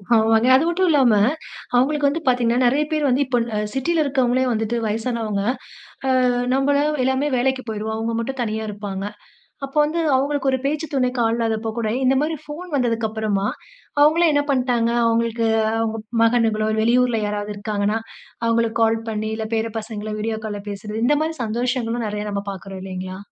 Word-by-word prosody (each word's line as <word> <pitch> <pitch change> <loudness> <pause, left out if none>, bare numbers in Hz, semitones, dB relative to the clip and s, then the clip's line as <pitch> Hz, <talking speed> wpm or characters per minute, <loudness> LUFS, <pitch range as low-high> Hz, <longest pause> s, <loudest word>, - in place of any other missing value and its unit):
ஆமாங்க. 225 +1 +4
அது 265 +3 +5
மட்டுமில்லாம 330 -9 +3 0.6
அவுங்களுக்கு 285 +3 +3
வந்து 305 +4 -1
பார்த்தீங்கன்னா, 245 -2 +2
நிறைய 275 +5 +3
பேர் 305 -2 +1
வந்து 255 +1 +2
இப்ப 250 -1 +1 0.2
அ - - +1 0.2
சிட்டில 320 +5 +1
இருக்கிறவங்களே 260 -3 +1
வந்துட்டு 225 +1 -1
வயசானவங்க, 220 -2 -2 0.8
அ - - +3 0.2
நம்பலாம் 285 +2 +2
எல்லாமே 265 +3 +1
வேலைக்கு 260 +1 +1
போயிடுவோம். 220 0 -3
அவுங்க 225 +1 -2
மட்டும் 260 +3 -3
தனியா 220 -1 -2
இருப்பாங்க. 200 -2 -5 0.6
அப்ப 275 - -15
வந்து 320 +3 -2 0.2
அவுங்களுக்கு 275 0 +1
ஒரு 260 - +1
பேச்சு 300 +3 -1
துணைக்கு 250 -2 +1
ஆள் 225 0 +1
இல்லாதப்போ 225 -1 -1
கூட 220 -2 -1
இந்தமாரி 275 +5 +2
ஃபோன் 325 +5 -8
வந்ததுக்கு 235 -4 +1
அப்பறமா, 210 -2 -1 0.5
அவுங்களே 315 +3 +5
என்ன 290 0 +3
பண்டாங்க, 250 -3 +1 0.2
அவுங்களுக்கு 230 0 +1 0.3
அவுங்க 225 0 -1 0.2
மகனுங்களோ, 225 -2 +2
வெளியூர்ல 240 0 +3
யாராவது 205 0 -3
இருக்காங்கனா, 210 +1 -1 0.5
அவுங்களுக்கு 230 0 +1
கால் 225 0 +2
பண்ணி, 215 0 -2
இல்ல 220 - -3
பேர 225 0 -1
பசங்கள 215 -1 -6
வீடியோ 220 +1 -2
கால்ல 205 -2 -4
பேசுறது, 210 +2 -4
இந்தமாரி 310 +4 +1
சந்தோஷங்களும் 235 0 -1
நிறைய 210 0 -3
நம்ம 200 0 -2
பார்க்குறோம் 195 0 -8
இல்லேங்களா! 185 0 -6
230 Hz, 155 wpm, -21 LUFS, 220-265 Hz, 0.8 s, அது